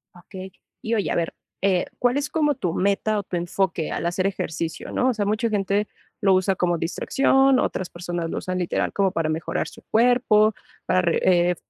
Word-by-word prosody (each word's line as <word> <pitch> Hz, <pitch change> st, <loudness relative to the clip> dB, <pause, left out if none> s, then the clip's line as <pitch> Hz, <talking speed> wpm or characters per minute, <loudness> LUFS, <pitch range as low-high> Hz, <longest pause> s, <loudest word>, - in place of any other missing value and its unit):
Okey. 185 Hz, +1 st, -10 dB, 0.3 s
Y 225 Hz, +1 st, -1 dB
oye, 205 Hz, -, 0 dB
a -, -, 0 dB
ver, 170 Hz, -1 st, -1 dB, 0.3 s
eh, 190 Hz, -2 st, +2 dB
¿cuál 245 Hz, +2 st, +2 dB
es 290 Hz, 0 st, -2 dB
como 295 Hz, -3 st, +1 dB
tu 180 Hz, -8 st, -2 dB
meta 200 Hz, +3 st, +1 dB
o -, -, -4 dB
tu 185 Hz, -, -5 dB
enfoque 175 Hz, -1 st, -1 dB
al -, -, -3 dB
hacer 185 Hz, +2 st, 0 dB
ejercicio, 165 Hz, -3 st, -4 dB
no? 255 Hz, -, +1 dB
O -, -, +2 dB
sea, 210 Hz, -3 st, -1 dB
mucha 215 Hz, +3 st, 0 dB
gente 205 Hz, 0 st, 0 dB, 0.3 s
lo 195 Hz, -1 st, +4 dB
usa 190 Hz, +1 st, +2 dB
como 175 Hz, -1 st, +1 dB
distracción, 270 Hz, +10 st, +2 dB
otras 185 Hz, -, -2 dB
personas 175 Hz, -1 st, -4 dB
lo -, -, -4 dB
usan 185 Hz, 0 st, -3 dB
literal 180 Hz, -2 st, -1 dB
como 195 Hz, -2 st, +2 dB
para 165 Hz, -2 st, -1 dB
mejorar 155 Hz, 0 st, -2 dB
su -, -, -13 dB
cuerpo, 220 Hz, -2 st, +4 dB, 0.3 s
para 185 Hz, -, +2 dB
re 170 Hz, -2 st, +1 dB, 0.3 s
eh, -, -, -2 dB
195 Hz, 200 wpm, -23 LUFS, 175-215 Hz, 0.3 s, lo